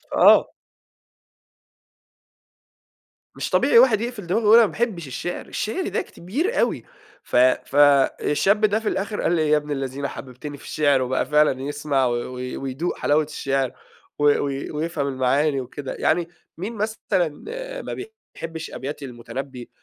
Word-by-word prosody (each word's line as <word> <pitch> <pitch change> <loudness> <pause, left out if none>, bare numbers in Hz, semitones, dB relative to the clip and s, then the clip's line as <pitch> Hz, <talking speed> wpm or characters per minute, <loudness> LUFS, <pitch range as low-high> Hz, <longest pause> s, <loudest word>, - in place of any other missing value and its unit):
آه. - - +6 2.9
مش - - -3
طبيعي 465 - +5
واحد 220 - +5
يقفل 235 -6 -5
دماغه 190 +6 +1
ويقول 215 +2 +7
أنا 235 - +7
ما - - -4
باحبّش 205 - -2
الشِعر، 175 +7 -5
الشِعر 350 - -3
ده - - -1
كبير 315 - -3
أوي. - - +1 0.4
ف - - -6
ف 125 +1 +3 0.5
الشاب 200 +8 +2
ده 215 +1 +2
في 220 - -6
الآخِر 200 +2 -2
قال - - +1
لي: 155 -2 +1
"يا 150 - +5
ابن 150 0 -5
الذين 135 0 -3
حبّبتني 135 +3 -8
في - - -16
الشِعر." 145 -3 +2
وبقى 130 +1 0
فعلًا 150 -3 +3
يسمع 145 -1 0
و 120 - +1
و 120 +1 -4 0.2
ويدوق 135 +6 -3
حلاوة 150 +2 +2
الشعِر 135 -3 -2 0.5
و - - 0
و 145 -1 +4 0.3
ويفهم 155 -2 -2
المعاني 135 +2 +1
وكده. 135 +2 -7
يعني 165 +2 +1 0.3
مين 200 +7 -5
مثلًا 200 -7 -1
آآ - - -6
ما - - -6 0.4
بيحبّش 165 -1 -6
أبيات 140 +2 -6
المُتنبّي 125 0 -7
150 Hz, 150 wpm, -23 LUFS, 135-205 Hz, 2.9 s, ويقول